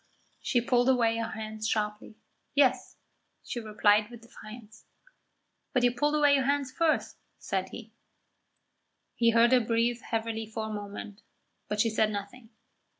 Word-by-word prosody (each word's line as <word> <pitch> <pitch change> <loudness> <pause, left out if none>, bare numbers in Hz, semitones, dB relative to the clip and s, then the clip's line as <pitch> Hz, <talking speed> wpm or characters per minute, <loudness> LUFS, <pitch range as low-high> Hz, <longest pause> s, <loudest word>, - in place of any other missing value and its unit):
She 240 - +1
pulled 245 +1 +2
away 230 -3 +2
her 230 0 -2
hands 215 0 -5
sharply. 210 0 -2 0.4
"Yes," 260 -3 +2 0.5
she 240 - -5
replied 210 -1 +2
with 235 -1 -12
defiance. 220 -1 -13 0.9
"But 250 -3 +2
you 245 - +4
pulled 295 +5 +1
away 290 -1 +4
your 270 -2 +2
hands 280 -1 0
first," 320 +2 0 0.2
said - - -3
he. - - -10 1.2
He 230 -1 +3
heard 230 +1 +4
her 255 - +6
breathe 230 +1 0
heavily 225 -1 -3
for 220 0 -5
a 215 - -5
moment, 205 0 -7 0.5
but 210 - -3
she 230 - +1
said 215 0 +2
nothing. 215 +3 -7
230 Hz, 150 wpm, -28 LUFS, 215-250 Hz, 1.2 s, her